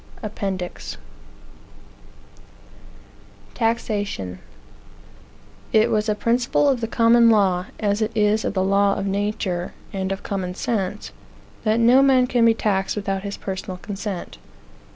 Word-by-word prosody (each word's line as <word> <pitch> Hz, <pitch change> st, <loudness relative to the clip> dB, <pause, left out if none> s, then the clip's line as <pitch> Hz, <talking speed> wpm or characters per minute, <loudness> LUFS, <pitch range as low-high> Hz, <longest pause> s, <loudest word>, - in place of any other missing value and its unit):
APPENDIX 195 Hz, -4 st, -5 dB, 2.6 s
TAXATION 205 Hz, -, -2 dB, 1.3 s
It 220 Hz, 0 st, +4 dB
was 215 Hz, 0 st, +1 dB
a 210 Hz, -, +1 dB
principle 240 Hz, +6 st, +1 dB
of 265 Hz, -4 st, +2 dB
the 225 Hz, -, -1 dB
Common 230 Hz, 0 st, +5 dB
Law, 195 Hz, -4 st, +2 dB
as 205 Hz, 0 st, 0 dB
it 215 Hz, +1 st, 0 dB
is 210 Hz, +1 st, +2 dB
of -, -, -2 dB
the 185 Hz, -, +2 dB
law 200 Hz, +1 st, +3 dB
of 195 Hz, -, -3 dB
nature, 195 Hz, -3 st, -2 dB, 0.2 s
and 190 Hz, -1 st, -2 dB
of 195 Hz, -, -4 dB
common 185 Hz, -2 st, -3 dB
sense, 205 Hz, -2 st, -3 dB, 0.5 s
that 220 Hz, +1 st, +2 dB
no 240 Hz, +3 st, +6 dB
man 265 Hz, -2 st, +5 dB
can 245 Hz, -2 st, +2 dB
be 225 Hz, -1 st, +5 dB
taxed 195 Hz, -3 st, 0 dB
without 195 Hz, -2 st, -2 dB
his 200 Hz, 0 st, -5 dB
personal 190 Hz, -1 st, -5 dB
consent. 200 Hz, -1 st, -6 dB
205 Hz, 130 wpm, -22 LUFS, 195-230 Hz, 2.6 s, no